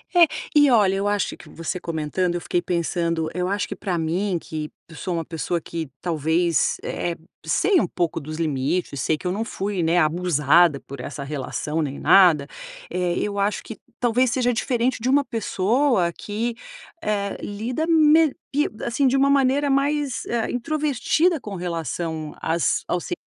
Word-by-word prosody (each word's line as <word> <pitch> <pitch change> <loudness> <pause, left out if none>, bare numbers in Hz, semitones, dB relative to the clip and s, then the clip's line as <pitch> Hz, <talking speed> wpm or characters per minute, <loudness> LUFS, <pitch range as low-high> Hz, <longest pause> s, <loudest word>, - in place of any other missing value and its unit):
É, 345 -1 +8 0.3
e 290 -1 +7
olha, 205 -5 +4
eu 200 +1 0
acho 205 -1 -1
que - - -14
você 165 +3 -4
comentando, 170 +2 -1
eu 175 - -2
fiquei 175 - 0
pensando, 170 -2 -1
eu 180 +2 -1
acho 200 +2 -1
que - - -5
pra 185 -4 -2
mim 175 +4 0
que 155 -1 -6 0.2
eu 160 - -12
sou 180 +3 -4
uma 165 - -1
pessoa 170 +1 -2
que, 160 -2 -5
talvez, 165 0 +1
eh 175 - -2
eh, 170 - -6 0.3
sei 395 - +3
um 190 - +1
pouco 170 -2 -1
dos 155 +1 -7
limites, 150 0 -1
sei 155 - +1
que - - -15
eu - - 0
não 215 +4 -2
fui, 200 -3 -3
né, 165 +2 +2
abusada 155 -1 +3
por 140 0 -10
essa 140 +3 -6
relação 150 +2 -3
nem 140 -2 -3
nada, 170 -7 +5 0.4
eh, 180 -1 -1
eu 205 -1 -2
acho 200 +1 0
que 225 - -8 0.2
talvez 245 +1 +2
seja 245 -1 +2
diferente 245 +2 0
de 250 - 0
uma 285 +2 +4
pessoa 225 -3 +1
que, 225 +5 -3 0.5
eh, 200 -1 -1
lida 230 +9 -3
me 315 -2 +5 0.2
pi 295 +1 +2 0.2
assim, 265 +4 +1
de 260 - +2
uma 275 +1 +4
maneira 280 +1 +3
mais, 280 -1 0
ah, 235 -1 -1
introvertida 305 +5 +1
com 205 -5 -7
relação 165 -3 -4
às 165 +1 +1
ao 175 - 0
ci 265 - -5
185 Hz, 180 wpm, -23 LUFS, 165-245 Hz, 0.5 s, É